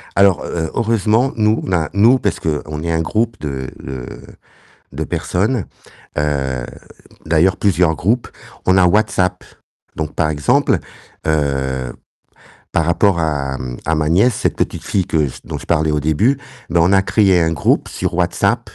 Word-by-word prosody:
Alors 100 Hz, -2 st, +4 dB
heu 80 Hz, -2 st, -3 dB
heureusement, 115 Hz, +3 st, +2 dB
nous, 110 Hz, 0 st, +2 dB
on 95 Hz, -, -4 dB
a, 80 Hz, -3 st, +1 dB
nous, 115 Hz, +6 st, +5 dB
parce -, -, -1 dB
qu'on 75 Hz, -1 st, -3 dB
est 85 Hz, -, -1 dB
un 80 Hz, -, +1 dB
groupe 110 Hz, +6 st, -1 dB
de 65 Hz, -3 st, -4 dB
de 65 Hz, -2 st, -6 dB, 0.9 s
de -, -, -3 dB
personnes, 105 Hz, +3 st, -1 dB, 0.5 s
heu, 70 Hz, -4 st, -1 dB, 0.6 s
d'ailleurs 85 Hz, +4 st, +3 dB
plusieurs 90 Hz, -5 st, +2 dB
groupes, 115 Hz, +7 st, 0 dB, 0.4 s
on 95 Hz, -, +4 dB
a 95 Hz, -, +5 dB
WhatsApp 90 Hz, -2 st, +1 dB, 0.5 s
donc, 80 Hz, -1 st, -4 dB
par 80 Hz, -3 st, +1 dB
exemple, 75 Hz, -3 st, +2 dB, 0.5 s
heu, 65 Hz, -4 st, -1 dB, 0.8 s
par 80 Hz, -, +2 dB
rapport 85 Hz, +1 st, +2 dB
à, 70 Hz, -4 st, -1 dB
hem, 60 Hz, -1 st, -6 dB
à 80 Hz, -, +1 dB
ma 75 Hz, 0 st, 0 dB
nièce, 100 Hz, +9 st, +4 dB
cette -, -, -1 dB
petite -, -, -2 dB
fille 95 Hz, -3 st, 0 dB
que 75 Hz, -3 st, +1 dB, 0.2 s
dont -, -, -5 dB
je -, -, -11 dB
parlais 80 Hz, 0 st, +2 dB
au 75 Hz, -, +1 dB
début, 90 Hz, -, +2 dB, 0.3 s
ben, 85 Hz, -, +3 dB
on 90 Hz, +4 st, +3 dB
a 95 Hz, -, +5 dB
créé 95 Hz, -3 st, +3 dB
un 80 Hz, -, +1 dB
groupe 70 Hz, -, +1 dB
sur -, -, -3 dB
WhatsApp -, -, 0 dB
85 Hz, 165 wpm, -18 LUFS, 75-100 Hz, 0.9 s, nous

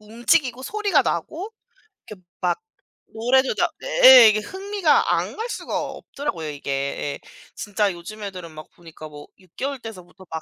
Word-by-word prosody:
움직이고 240 Hz, +4 st, 0 dB
소리가 405 Hz, -2 st, +1 dB
나고 315 Hz, -, -3 dB, 0.6 s
이렇게 210 Hz, -, -11 dB, 0.2 s
막 180 Hz, -, 0 dB, 0.5 s
노래도 255 Hz, +4 st, +1 dB
나 -, -, +1 dB
네 -, -, -3 dB, 0.2 s
예 220 Hz, -, +9 dB
이게 215 Hz, 0 st, +1 dB
흥미가 385 Hz, -, 0 dB
안 -, -, -3 dB
갈 450 Hz, -, -3 dB
수가 -, -, -4 dB
없더라고요 175 Hz, -, -6 dB
이게. 145 Hz, -1 st, -6 dB
예. 140 Hz, +1 st, -3 dB, 0.4 s
진짜 205 Hz, -1 st, -1 dB
요즘 210 Hz, +5 st, -10 dB
애들은 185 Hz, -4 st, -7 dB
막 155 Hz, 0 st, -11 dB
보니까 165 Hz, -2 st, -12 dB
뭐 145 Hz, 0 st, -12 dB
6 185 Hz, -3 st, -25 dB
개월 275 Hz, +1 st, -3 dB
때서부터 190 Hz, -4 st, -12 dB
막 160 Hz, -, -4 dB
215 Hz, 315 characters per minute, -22 LUFS, 170-285 Hz, 0.6 s, 예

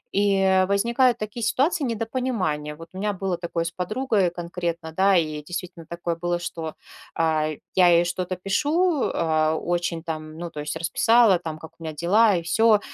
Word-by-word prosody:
И 195 Hz, -2 st, +3 dB
возникают 235 Hz, +5 st, +2 dB
такие 215 Hz, +2 st, -5 dB
ситуации 280 Hz, +6 st, +1 dB
недопонимания. 225 Hz, -, -2 dB
Вот 165 Hz, +2 st, -12 dB
у -, -, -9 dB
меня 205 Hz, +1 st, -1 dB
было 190 Hz, -2 st, -2 dB
такое 170 Hz, -1 st, -3 dB
с 170 Hz, -, -4 dB
подругой, 215 Hz, +3 st, 0 dB
и -, -, +1 dB
конкретно, 170 Hz, -1 st, -4 dB
да, 190 Hz, +4 st, +3 dB
и 165 Hz, -, +4 dB, 0.2 s
действительно 175 Hz, +1 st, -7 dB
такое 170 Hz, 0 st, -3 dB
было, 175 Hz, +1 st, -2 dB
что, 165 Hz, -2 st, -5 dB, 0.4 s
а, 160 Hz, -2 st, +1 dB, 0.3 s
я 180 Hz, -1 st, +6 dB
ей 170 Hz, 0 st, +5 dB
что-то 180 Hz, +1 st, -3 dB
пишу, 295 Hz, -, +1 dB
а, 160 Hz, -1 st, +1 dB
очень 170 Hz, -1 st, -2 dB
там, 155 Hz, -1 st, -6 dB
ну, 170 Hz, 0 st, -5 dB
то 150 Hz, -, -9 dB
есть, 150 Hz, -, -4 dB
расписала 225 Hz, +2 st, +4 dB
там, 160 Hz, -2 st, -6 dB
как 160 Hz, 0 st, -11 dB
у -, -, -11 dB
меня 160 Hz, -1 st, -4 dB
дела, 195 Hz, +7 st, +3 dB
и 170 Hz, -, -1 dB
всё. 215 Hz, +5 st, +4 dB
180 Hz, 180 wpm, -24 LUFS, 165-215 Hz, 0.4 s, я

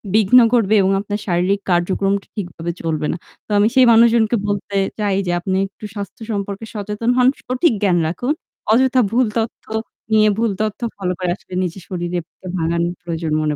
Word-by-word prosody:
বিঘ্ন 220 Hz, +4 st, +6 dB
করবে 220 Hz, -3 st, +3 dB
এবং 190 Hz, +1 st, +2 dB
আপনার 205 Hz, 0 st, -4 dB
শারীরিক 180 Hz, +3 st, +1 dB
কার্যক্রমটা 195 Hz, +3 st, +1 dB
ঠিকভাবে 175 Hz, -4 st, -4 dB
চলবে 155 Hz, -2 st, -1 dB
না। 170 Hz, -, -3 dB, 0.3 s
তো -, -, -11 dB
আমি 205 Hz, +1 st, +5 dB
সেই 260 Hz, -1 st, +7 dB
মানুষজনকে 230 Hz, 0 st, +5 dB
বলতে 200 Hz, -1 st, -2 dB, 0.2 s
চাই 200 Hz, -2 st, +1 dB
যে -, -, +1 dB
আপনি 190 Hz, +2 st, -1 dB
একটু 205 Hz, +2 st, -12 dB
স্বাস্থ্য 200 Hz, +2 st, -7 dB
সম্পর্কে 200 Hz, +1 st, -4 dB
সচেতন 210 Hz, +2 st, -3 dB
হন, 250 Hz, 0 st, +5 dB, 0.2 s
সঠিক 255 Hz, +2 st, +1 dB
জ্ঞান 185 Hz, -3 st, +3 dB
রাখুন। 245 Hz, -, -1 dB, 0.4 s
অযথা 260 Hz, +2 st, +4 dB
ভুল 250 Hz, +2 st, +3 dB
তথ্য 225 Hz, 0 st, -3 dB, 0.5 s
নিয়ে 215 Hz, -1 st, +5 dB
ভুল 225 Hz, -2 st, +1 dB
তথ্য 215 Hz, -1 st, -2 dB, 0.2 s
ফলো 185 Hz, -2 st, -2 dB
করে 180 Hz, -1 st, 0 dB
আসলে 185 Hz, -, -16 dB
নিজের 180 Hz, +1 st, -5 dB
শরীরে 175 Hz, -1 st, -3 dB, 0.4 s
ভাঙানোর 170 Hz, +1 st, 0 dB
প্রয়োজন 165 Hz, -2 st, -4 dB
মনে 150 Hz, -1 st, 0 dB
200 Hz, 175 wpm, -19 LUFS, 175-225 Hz, 0.5 s, সেই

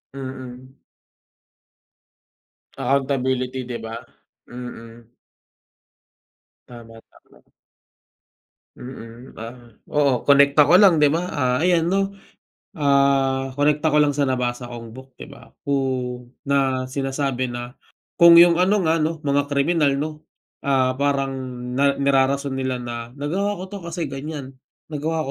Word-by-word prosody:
Mm. 130 Hz, -1 st, -8 dB, 2.0 s
Accountability, 130 Hz, -2 st, -1 dB
di 120 Hz, -, -3 dB
ba? 110 Hz, 0 st, -8 dB, 0.6 s
Mm. 120 Hz, -1 st, -10 dB, 1.6 s
Tama, 115 Hz, -2 st, -12 dB
tama. -, -, -24 dB, 1.3 s
Mm. 125 Hz, 0 st, -11 dB
Ah, 120 Hz, +2 st, -10 dB, 0.2 s
oo, 140 Hz, -4 st, +2 dB
konekta 140 Hz, +1 st, +5 dB
ko 170 Hz, -, +3 dB
lang 185 Hz, -5 st, +6 dB
di 150 Hz, -, +5 dB
ba, 165 Hz, +5 st, 0 dB
ah, 130 Hz, -3 st, 0 dB
ayan 175 Hz, -1 st, +2 dB
'no, 195 Hz, +2 st, +1 dB, 0.7 s
ah, 140 Hz, -2 st, +2 dB
konekta 150 Hz, +2 st, +2 dB
ko 150 Hz, -, +1 dB
lang 150 Hz, -1 st, +4 dB
sa 140 Hz, -1 st, 0 dB
nabasa 125 Hz, -1 st, -2 dB
kong 115 Hz, -2 st, -9 dB
book, 130 Hz, 0 st, -14 dB
di -, -, -9 dB
ba? -, -, -15 dB, 0.2 s
Kung 130 Hz, -3 st, -2 dB, 0.2 s
na 135 Hz, -2 st, +1 dB
sinasabi 135 Hz, -1 st, -2 dB
na 120 Hz, 0 st, -6 dB, 0.5 s
kung 170 Hz, 0 st, +9 dB
yung 170 Hz, 0 st, +7 dB
ano 195 Hz, +3 st, +3 dB
nga 160 Hz, +1 st, +2 dB
'no, 160 Hz, +2 st, 0 dB
mga 145 Hz, 0 st, +1 dB
kriminal 145 Hz, 0 st, +1 dB
'no, 155 Hz, +1 st, -4 dB, 0.4 s
ah, 130 Hz, -2 st, +1 dB
parang 140 Hz, -1 st, 0 dB, 0.4 s
na 140 Hz, +2 st, +2 dB
nirarason 140 Hz, 0 st, +1 dB
nila 130 Hz, -1 st, -2 dB
na 120 Hz, -1 st, -6 dB
nagawa 190 Hz, +9 st, -2 dB
ko 190 Hz, -, -14 dB
'to 200 Hz, -, -5 dB
kasi 170 Hz, 0 st, -3 dB
ganyan. 140 Hz, 0 st, -6 dB, 0.4 s
Nagawa 155 Hz, +2 st, -2 dB
135 Hz, 125 wpm, -22 LUFS, 125-150 Hz, 2.0 s, kung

